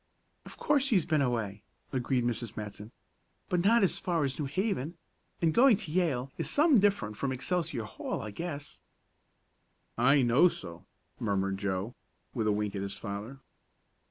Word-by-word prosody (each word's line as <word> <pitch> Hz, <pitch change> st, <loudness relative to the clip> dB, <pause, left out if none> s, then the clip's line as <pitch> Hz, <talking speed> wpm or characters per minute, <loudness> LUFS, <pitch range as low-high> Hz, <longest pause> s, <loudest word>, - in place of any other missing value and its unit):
"Of -, -, -11 dB
course 280 Hz, -2 st, +2 dB
he's 190 Hz, -, +3 dB
been 155 Hz, -3 st, +2 dB
away," 110 Hz, -6 st, -1 dB, 0.3 s
agreed 130 Hz, -1 st, 0 dB
Mrs. 120 Hz, -1 st, -2 dB
Matson, 105 Hz, +1 st, -6 dB, 0.6 s
"but 175 Hz, -1 st, +1 dB
not 230 Hz, +2 st, +5 dB
as 190 Hz, -, +2 dB
far 175 Hz, -5 st, 0 dB
as 135 Hz, 0 st, -2 dB
New 150 Hz, -, -1 dB
Haven, 170 Hz, -, -2 dB, 0.5 s
and 160 Hz, -1 st, +3 dB
going 245 Hz, -, +6 dB
to 190 Hz, -8 st, -7 dB
Yale 145 Hz, -7 st, 0 dB
is -, -, -1 dB
some 295 Hz, -4 st, +5 dB
different 195 Hz, -, +1 dB
from 140 Hz, -, -1 dB
Excelsior 155 Hz, 0 st, -1 dB
Hall, 105 Hz, -, -5 dB
I 110 Hz, -, -6 dB
guess." 145 Hz, +3 st, -6 dB, 1.2 s
"I 135 Hz, +3 st, +5 dB
know 125 Hz, +8 st, +5 dB
so," 85 Hz, -, -7 dB, 0.3 s
murmured 95 Hz, -2 st, -1 dB
Joe, 100 Hz, +3 st, -2 dB, 0.4 s
with 115 Hz, -4 st, -1 dB
a -, -, +4 dB
wink 105 Hz, 0 st, -1 dB
at 95 Hz, -, -2 dB
his 100 Hz, 0 st, -4 dB
father. 110 Hz, +6 st, -6 dB
135 Hz, 160 wpm, -30 LUFS, 105-175 Hz, 1.2 s, going